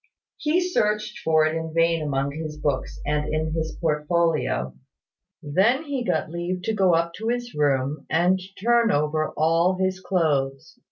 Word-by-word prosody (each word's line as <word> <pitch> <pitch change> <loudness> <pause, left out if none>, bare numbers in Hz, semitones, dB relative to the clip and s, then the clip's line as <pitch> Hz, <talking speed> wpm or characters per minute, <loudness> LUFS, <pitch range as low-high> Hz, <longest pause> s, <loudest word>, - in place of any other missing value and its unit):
He 310 +4 +1
searched 210 -10 0
for 155 -1 +3
it 155 - 0
in 160 0 -4
vain 165 0 +3
among 140 -2 -1
his 155 0 -6
books 145 -3 -2
and 150 +1 -1
in 155 0 -1
his 160 -1 -3
portfolio. 155 - 0 0.7
Then 200 - +2
he 280 -5 -3
got 160 - -1
leave 175 +2 -3
to 220 - -1
go 190 -5 +3
up 170 0 0
to 220 - -4
his 240 0 -2
room, 140 -1 0
and 175 +3 +3 0.2
turn 235 +2 +3
over 150 +1 0
all 165 +4 +3
his 185 0 0
clothes. 150 -8 -1
165 Hz, 160 wpm, -24 LUFS, 150-190 Hz, 0.7 s, for